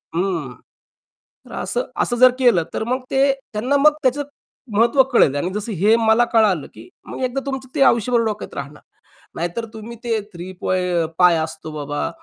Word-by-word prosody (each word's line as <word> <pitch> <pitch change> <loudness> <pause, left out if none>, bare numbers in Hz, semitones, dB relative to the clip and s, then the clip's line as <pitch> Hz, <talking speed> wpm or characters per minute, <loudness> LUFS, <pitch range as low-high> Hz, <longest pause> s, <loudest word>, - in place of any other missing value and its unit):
हं. 170 -8 -2 0.9
तर - - -15
असं - - -2 0.2
असं 240 - 0
जर 255 0 +8
केलं 235 -10 +4
तर - - -2
मग 255 +2 -1
ते 275 +1 +3 0.2
त्यांना 250 +7 +1
मग 300 +2 +5
त्याचं 270 +3 +1 0.5
महत्त्व 240 +4 +5
कळेल 145 - +4
आणि 175 +5 -1
जसं 210 +2 -4
हे 205 +6 +3
मला 225 +1 +3
कळालं 205 -9 +3
की 110 +2 -13 0.2
मग - - -8
एकदा 255 +2 -1
तुमचं 265 -1 -4
ते 280 - 0
आयुष्यभर 235 -1 +3
डोक्यात 210 -1 -4
राहणार. 140 +2 -7 0.5
नाहीतर 175 +7 -3
तुम्ही 220 +1 -9
ते 225 -2 0
थ्री 175 +2 -8
पॉइं 180 -3 0
π 175 -2 +6
असतो 160 0 -5
बाबा 145 -1 -3
220 Hz, 170 wpm, -20 LUFS, 170-250 Hz, 0.9 s, जर